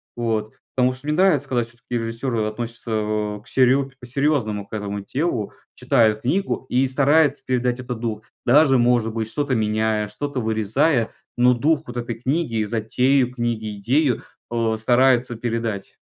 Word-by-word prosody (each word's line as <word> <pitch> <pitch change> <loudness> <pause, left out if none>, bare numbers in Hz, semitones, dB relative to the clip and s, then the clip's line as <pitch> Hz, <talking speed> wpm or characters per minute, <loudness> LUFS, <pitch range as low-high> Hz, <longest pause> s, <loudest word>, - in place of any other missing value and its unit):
Вот. 110 -2 -2 0.2
Потому 125 0 +3
что 130 +3 -12
мне 150 - +1
нравится, 155 -6 +3
когда 125 -2 +1
всё-таки 120 +2 -14
режиссеры 115 +1 -2
относятся, 115 +2 -5
а, 105 -1 -1
к - - -21
серьё 135 +1 +3
по-серьёзному 120 -5 0
к - - -18
этому 105 -1 -3
делу, 125 - -2 0.2
читают 110 -2 +2
книгу 185 +2 -1
и 130 +1 +2
стараются 145 +1 +3
передать 125 -1 0
этот 125 -2 -5
дух, 110 -2 -3 0.2
даже, 135 +1 +5
может 120 -2 +2
быть, 110 -1 -3
что-то 145 +2 -1
меняя, 110 0 0
что-то 145 +3 -4
вырезая, 110 +4 +1 0.3
но 125 +1 +5
дух 145 +5 +1
вот 125 0 -8
этой 120 -1 -3
книги, 125 -1 -1
затею 125 +4 +1
книги, 115 -4 -3
идею, 125 +5 +1 0.3
э, 115 -1 0
стараются 125 +1 +3
передать. 115 -3 -3
120 Hz, 155 wpm, -22 LUFS, 110-130 Hz, 0.3 s, даже